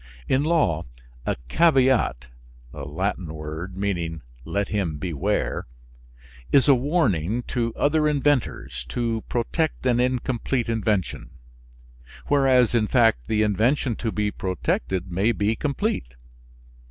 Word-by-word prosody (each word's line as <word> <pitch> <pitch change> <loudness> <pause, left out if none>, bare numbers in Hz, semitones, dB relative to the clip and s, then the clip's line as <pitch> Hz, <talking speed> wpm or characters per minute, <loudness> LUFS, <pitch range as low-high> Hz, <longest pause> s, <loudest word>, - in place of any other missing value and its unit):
In 135 +2 +2
law, 145 - +1 0.4
a - - +1
caveat 130 - +3 0.5
(Latin 80 +5 -3
word, 80 +5 -6
meaning 85 -6 -2 0.2
"Let 100 0 -1
him 95 -8 -1
beware") 75 -5 -2 0.8
is 140 - +5
a 140 - +8
warning 125 - +1
to 115 -2 0
other 150 +1 +2
inventors, 140 - 0
to 115 - -1
protect 140 +5 -1
an 120 -1 +3
incomplete 125 -1 0
invention; 105 -5 -1 1.0
whereas 130 -4 +4
in 110 -3 +2
fact 115 - +3
the 110 0 +2
invention 115 +5 +1
to 115 - -2
be 105 -1 -1
protected 90 -1 -2
may 95 +6 +2
be 105 +1 0
complete. 140 - -2
110 Hz, 115 wpm, -24 LUFS, 90-130 Hz, 1.0 s, a